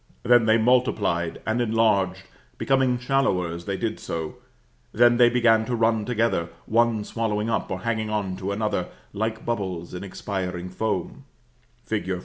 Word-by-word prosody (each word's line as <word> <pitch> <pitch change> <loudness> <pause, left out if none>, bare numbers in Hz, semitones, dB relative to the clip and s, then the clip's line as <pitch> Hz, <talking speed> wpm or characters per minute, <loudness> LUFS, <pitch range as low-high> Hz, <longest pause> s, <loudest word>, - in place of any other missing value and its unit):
Then 120 -1 +5
they 110 +1 +5
multiplied 110 -8 +1
and 110 +2 0
enlarged, 100 -5 +1 0.3
becoming 130 -2 +2
shallower 125 -9 +1
as 85 0 -7
they 100 -1 -2
did 110 0 -3
so; 80 -2 -5 0.5
then 120 +1 +4
they 120 -1 +6
began 115 -2 +4
to 120 - -1
run 115 -2 +1
together, 115 -8 0 0.2
one 115 -1 +2
swallowing 110 0 -2
up, - - -1
or 95 0 -4
hanging 110 -1 -1
on 100 -3 -2
to, 95 +1 -3
another, 105 +1 -1 0.3
like 110 +2 -3
bubbles 95 -7 -3
in 90 +1 -6
expiring 90 -2 -4
foam 110 +5 -3 0.6
fig. 95 -4 -2
110 Hz, 150 wpm, -24 LUFS, 95-115 Hz, 0.6 s, they